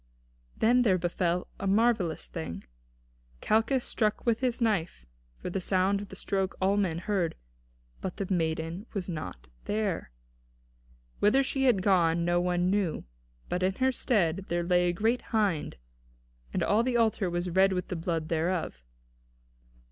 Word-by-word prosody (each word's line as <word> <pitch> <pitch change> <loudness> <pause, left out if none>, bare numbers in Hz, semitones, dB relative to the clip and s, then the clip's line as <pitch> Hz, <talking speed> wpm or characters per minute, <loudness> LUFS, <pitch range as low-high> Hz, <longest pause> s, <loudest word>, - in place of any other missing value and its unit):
Then 245 +3 +4
there 200 -6 +3
befell 175 0 0
a 195 - -2
marvellous 200 -5 +2
thing. 160 - -6 0.8
Calchas 225 - +2
struck 215 -2 -1
with 230 -2 +2
his 250 -2 0
knife, 190 - 0 0.3
for - - -6
the 195 - -2
sound 190 +2 +1
of 205 - -9
the - - -9
stroke 195 0 -2
all 195 +1 +2
men 185 -6 0
heard, 180 -2 -1 0.7
but 185 - -4
the 200 - -2
maiden 165 +3 -2
was 190 -3 -2
not 155 - -6 0.2
there. 205 - -1 1.1
Whither 260 +7 +4
she 270 0 0
had 215 -8 +3
gone 170 -4 +3
no 175 0 +2
one 180 0 +1
knew; 200 -5 0 0.4
but 180 - -2
in 190 +1 +1
her 260 +4 +2
stead 195 -8 0
there 175 0 0
lay 175 0 +3
a - - 0
great 225 +7 +1
hind, 205 -9 -1 0.7
and - - 0
all 210 +3 +3
the 240 0 +1
altar 220 -4 +2
was 175 +1 -2
red 190 +2 +4
with 180 -1 -2
the 180 - -2
blood 165 -2 -2
thereof. 165 - -1
190 Hz, 155 wpm, -29 LUFS, 175-215 Hz, 1.1 s, Then